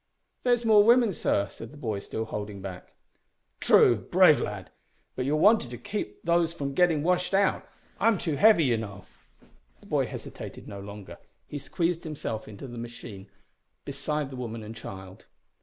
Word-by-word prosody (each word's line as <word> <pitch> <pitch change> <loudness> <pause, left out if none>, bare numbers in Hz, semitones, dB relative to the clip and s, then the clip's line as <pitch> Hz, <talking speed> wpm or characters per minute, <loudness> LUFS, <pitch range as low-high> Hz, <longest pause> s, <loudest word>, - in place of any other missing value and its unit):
"There's 245 -1 +2
more 215 -2 +7
women, 235 -2 +5
sir," 100 -10 0
said 115 - -10
the 150 - -14
boy, 110 -7 -3
still 110 +2 -4
holding 105 -2 -5
back. 95 -2 -9 0.7
"True - - +6
brave - - +4
lad! - - -5 0.4
but 130 - -2
you're 145 +3 +1
wanted 200 - +4
to 120 - -7
keep 120 - -5
these 170 -1 +2
from 140 -4 -4
getting 165 -3 +3
washed 180 +2 +1
out. 195 0 +1 0.3
I 220 - +3
am 225 -3 +4
too 160 -4 -2
heavy, 190 +3 +6
you 120 -5 +2
know." 100 -4 -7 0.7
The - - -19
boy - - 0
hesitated - - -8
no 100 - -7
longer. 100 0 -10 0.3
He 145 - -5
squeezed 170 +4 -1
himself 145 -8 -5
into 105 +3 -9
the 120 -1 -8
machine 115 -4 -9 0.6
beside 140 +1 -3
the - - -7
woman 115 -3 -5
and 110 +2 -8
child. 95 -3 -10
135 Hz, 175 wpm, -27 LUFS, 110-175 Hz, 0.7 s, more